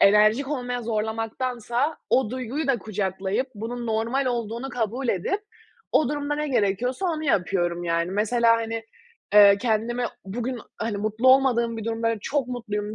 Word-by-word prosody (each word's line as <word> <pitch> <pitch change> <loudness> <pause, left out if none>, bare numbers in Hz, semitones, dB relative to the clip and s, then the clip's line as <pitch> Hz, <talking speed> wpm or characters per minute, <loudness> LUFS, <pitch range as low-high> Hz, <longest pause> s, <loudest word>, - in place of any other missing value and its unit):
enerjik 215 +7 +5
olmaya 250 -4 -3
zorlamaktansa 230 +5 -2
o 255 -4 +3
duyguyu 260 +4 -3
da 270 -3 +2
kucaklayıp 195 +2 -2
bunun 235 +3 -5
normal 230 +5 0
olduğunu 235 +1 -2
kabul 245 +1 -2
edip 230 - 0 0.5
o 310 - +4
durumda 290 0 -2
ne 300 0 -2
gerekiyorsa 245 - 0
onu 315 -3 -2
yapıyorum, 175 - 0
yani. 170 +1 0
Mesela, 230 +3 +3
hani, 225 0 -3 0.5
eee, 200 -1 +9
kendimi 240 +1 0 0.2
bugün, 240 +6 -3 0.2
hani, 225 -2 -1
mutlu 215 +5 +1
olmadığım 240 -3 +4
bir 220 - -5
durumda, 230 0 -1
böyle, 230 -1 -1
çok 275 +2 -1
mutluyum 215 -4 -4
230 Hz, 150 wpm, -25 LUFS, 210-255 Hz, 0.5 s, eee